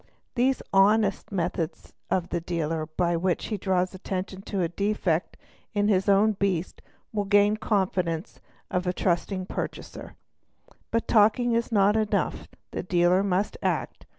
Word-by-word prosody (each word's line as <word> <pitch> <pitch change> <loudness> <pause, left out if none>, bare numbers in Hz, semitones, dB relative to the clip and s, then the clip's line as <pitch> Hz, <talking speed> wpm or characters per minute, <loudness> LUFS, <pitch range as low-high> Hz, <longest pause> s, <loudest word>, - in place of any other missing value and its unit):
These 255 +1 +1
"honest" 200 +1 +3
methods 170 -3 -3 0.2
of 180 -2 -1
a - - +1
dealer 165 -2 -2
by 170 +2 0
which 175 +1 0
he 215 - -1
draws 185 -2 0
attention 190 0 -5
to 195 -3 0
a - - +1
defect 185 -2 -1 0.4
in 205 0 +2
his 195 0 +2
own 200 +2 +5
beast, 190 -4 -2 0.3
always 205 -2 -2
gain 205 0 +5
the 215 - -4
confidence 185 -6 -1 0.3
of 180 - +1
the 180 0 -1
trusting 185 +1 -1
purchaser. - - -6 0.7
But 230 0 -1
talking 225 +3 +4
is 230 +1 0
not 205 -1 +4
enough, 215 -1 0 0.2
the - - -3
dealer 180 +1 +3
must 200 - 0
act. - - -2
195 Hz, 150 wpm, -26 LUFS, 180-210 Hz, 0.7 s, own